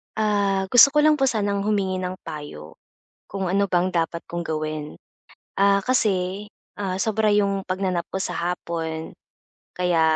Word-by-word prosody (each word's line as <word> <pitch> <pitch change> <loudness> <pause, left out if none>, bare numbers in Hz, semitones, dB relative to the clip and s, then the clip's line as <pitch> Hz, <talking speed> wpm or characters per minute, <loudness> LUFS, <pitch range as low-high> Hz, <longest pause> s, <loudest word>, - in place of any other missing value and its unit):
Ah, 200 -3 +1
gusto 245 +7 +7
ko 300 - +3
lang 305 0 +5
po 280 - -1
sanang 205 -6 0
humingi 200 -3 0
ng 185 0 -4
payo. 80 - -9 0.5
Kung 190 -2 -3
ano 200 +1 +2
bang 180 0 +1
dapat 170 -1 -1
kong 175 - -6
gawin, 155 -1 -4 0.6
ah, 200 0 +4
kasi 195 -4 0 0.3
ah, 195 -2 -3
sobra 220 0 +1
'yong 200 -1 +1
pagna-nap 185 -2 -1
ko 190 - -2
sa - - -3 0.2
hapon, 160 -2 -5 0.6
kaya 180 -2 +1
190 Hz, 150 wpm, -23 LUFS, 175-205 Hz, 0.6 s, gusto